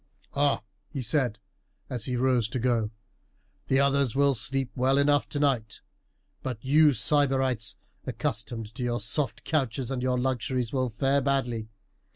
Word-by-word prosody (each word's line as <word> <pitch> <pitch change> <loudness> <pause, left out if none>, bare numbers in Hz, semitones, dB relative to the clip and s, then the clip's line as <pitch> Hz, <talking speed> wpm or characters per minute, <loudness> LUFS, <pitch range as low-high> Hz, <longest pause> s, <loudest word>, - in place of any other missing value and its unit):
"Ah!" 140 0 +1 0.3
he 135 -5 -5
said 120 -2 +2 0.5
as 120 -4 -3
he 125 - -2
rose 125 -3 +1
to 130 - -3
go, 120 -3 +1 0.8
"the 135 - +3
others 140 -2 +2
will 140 0 +4
sleep 130 +4 -2
well 130 +2 +2
enough 145 0 +2
tonight; 135 -7 -1 0.6
but 130 -3 -4
you 150 +2 +5
sybarites, 130 -3 +2 0.3
accustomed 115 -2 -4
to 120 - -8
your 120 -1 -1
soft 130 +7 +1
couches 135 -4 -1
and 130 -2 -2
your 125 0 0
luxuries, 125 -1 -1
will 130 -2 0
fare 135 +5 +1
badly. 125 -5 -1
130 Hz, 145 wpm, -27 LUFS, 120-140 Hz, 0.8 s, you